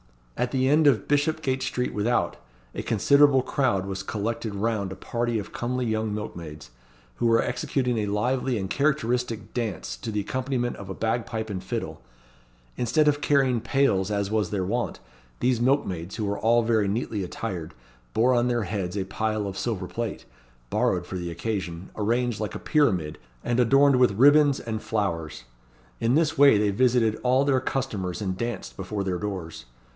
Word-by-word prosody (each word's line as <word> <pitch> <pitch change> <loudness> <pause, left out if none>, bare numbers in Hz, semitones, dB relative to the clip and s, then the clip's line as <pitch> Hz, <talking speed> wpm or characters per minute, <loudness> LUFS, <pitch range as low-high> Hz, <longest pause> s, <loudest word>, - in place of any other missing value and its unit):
At 125 - 0
the 130 -1 +1
end 150 +2 +4
of 115 -8 +3
Bishopgate 145 -2 +1
Street 125 0 -2
Without 110 +4 0 0.4
a - - -4
considerable 140 +4 +4
crowd 120 -11 0
was 95 -1 -4
collected 110 +1 -3
round 100 -2 -1
a - - -5
party 120 -1 -2
of 105 - -6
comely 125 +1 -2
young 110 -1 -1
milkmaids, 85 -9 -7 0.5
who 120 - +1
were 115 0 +4
executing 125 -1 -1
a 105 - -1
lively 125 +4 0
and 95 -2 -3
characteristic 125 -4 -1
dance 105 - -3
to 85 - -5
the 105 -1 -1
accompaniment 125 +2 -2
of 100 -1 -9
a 95 - -5
bagpipe 110 -1 -2
and 95 -2 -4
fiddle. - - -4 0.8
Instead 150 +6 +2
of 145 0 +2
carrying 135 -6 +2
pails 105 -9 +1
as 100 -1 -1
was 110 -1 +1
their 95 -3 -1
wont, 120 +4 -2 0.4
these 125 -2 +1
milkmaids, 100 - 0
who 110 - -2
were 100 0 -2
all 115 +2 +3
very 110 -3 +2
neatly 105 -1 -2
attired, 90 -3 -5 0.4
bore 120 +4 +4
on 120 0 +2
their 120 -2 +1
heads 95 -1 -3
a 95 - 0
pile 110 +2 -2
of 100 -1 -5
silver 100 -4 -2
plate, 115 +3 -5 0.5
borrowed 90 -1 +1
for 95 - -5
the 85 -1 -4
occasion, 90 -1 -4
arranged 120 +1 0
like 110 -2 -3
a - - -4
pyramid, 90 - +1 0.2
and 120 +1 0
adorned 135 +3 +5
with 125 -4 +4
ribands 145 +2 +6
and 110 -2 -4
flowers. 85 - -2 0.6
In 115 +3 +2
this 155 -2 +1
way 140 -6 +7
they 105 0 +2
visited 115 0 +2
all 130 +2 +3
their 135 -2 +3
customers 105 -11 -3
and 95 -3 -2
danced 115 +3 -4
before 100 +1 -4
their 90 -2 -2
doors. 90 -9 -5
110 Hz, 175 wpm, -26 LUFS, 100-125 Hz, 0.8 s, way